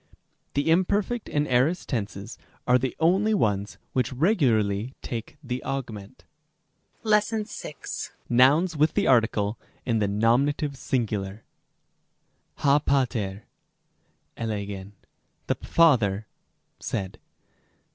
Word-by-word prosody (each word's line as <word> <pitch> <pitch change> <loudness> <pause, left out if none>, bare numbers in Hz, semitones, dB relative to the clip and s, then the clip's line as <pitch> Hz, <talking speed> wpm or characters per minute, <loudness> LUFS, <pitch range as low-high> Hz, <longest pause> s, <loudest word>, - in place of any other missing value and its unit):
6. - - -29 0.4
The 145 +3 +2
imperfect 200 +6 +1
and 150 0 0
aorist 135 +8 +2
tenses 100 -5 -4 0.3
are 125 0 +4
the 130 0 -2
only 195 +7 +3
ones 105 - 0 0.2
which 125 -3 0
regu 155 - +3
larly 110 +2 0
take 115 +2 -5
the 125 -1 -3
awgment. 125 -5 -5 0.8
§6. 210 -6 -1 0.2
Nouns, 145 +8 +4
with 155 +1 +2
the - - +2
article, 110 -3 +2 0.3
in 115 -2 +1
the 105 - +1
nominative 130 +8 +1
singular. 110 -6 -2 1.1
ὁ 145 +1 +3
πατὴρ 115 -8 0 1.0
ἔλεγεν, 100 -3 -4 0.5
the - - +1
father 115 -11 +3 0.5
said. 95 -1 -4
125 Hz, 105 wpm, -26 LUFS, 105-150 Hz, 1.1 s, are